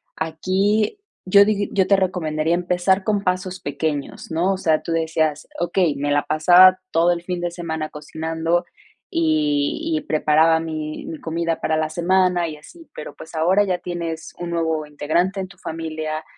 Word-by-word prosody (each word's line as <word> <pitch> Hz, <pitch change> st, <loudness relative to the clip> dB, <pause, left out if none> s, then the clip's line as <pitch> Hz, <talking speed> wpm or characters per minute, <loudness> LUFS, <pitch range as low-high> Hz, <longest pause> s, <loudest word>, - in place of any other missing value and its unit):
aquí 195 Hz, -, 0 dB, 0.3 s
yo 200 Hz, +2 st, +6 dB
dig 205 Hz, -1 st, 0 dB
yo 190 Hz, -2 st, +2 dB
te 200 Hz, -, +4 dB
recomendaría 165 Hz, -3 st, 0 dB
empezar 180 Hz, +2 st, +1 dB
con 205 Hz, -2 st, 0 dB
pasos 185 Hz, 0 st, -2 dB
pequeños, 145 Hz, +2 st, -4 dB
¿no? 175 Hz, +4 st, +1 dB
O -, -, -3 dB
sea, 160 Hz, -4 st, +1 dB
tú -, -, -6 dB
decías, 160 Hz, -2 st, 0 dB
okey, 175 Hz, -3 st, +1 dB
me 145 Hz, +1 st, -2 dB
la 145 Hz, 0 st, +2 dB
pasaba 180 Hz, +4 st, +6 dB
todo 170 Hz, +2 st, +3 dB
el 170 Hz, -1 st, -1 dB
fin 180 Hz, 0 st, -4 dB
de 175 Hz, -1 st, -2 dB
semana 160 Hz, -3 st, -4 dB
cocinando 160 Hz, +3 st, -2 dB, 0.5 s
y 315 Hz, -1 st, 0 dB
y -, -, -10 dB
preparaba 160 Hz, -, +3 dB
mi 155 Hz, -1 st, -5 dB
mi 160 Hz, -, -7 dB
comida 165 Hz, 0 st, -2 dB
para 155 Hz, 0 st, 0 dB
la 155 Hz, 0 st, 0 dB
semana 180 Hz, +1 st, +2 dB
y 155 Hz, -2 st, -7 dB
así, 330 Hz, -, -16 dB
pero, 155 Hz, -, -8 dB
pues, 160 Hz, 0 st, -12 dB
ahora 185 Hz, +6 st, +3 dB
ya 180 Hz, -2 st, 0 dB
tienes 170 Hz, -2 st, -5 dB
un 175 Hz, -1 st, -4 dB
nuevo 160 Hz, -2 st, -1 dB
integrante 170 Hz, +6 st, -1 dB
en 190 Hz, -, -3 dB
tu 195 Hz, 0 st, -17 dB
familia 155 Hz, -1 st, -4 dB
170 Hz, 170 wpm, -21 LUFS, 160-185 Hz, 0.5 s, yo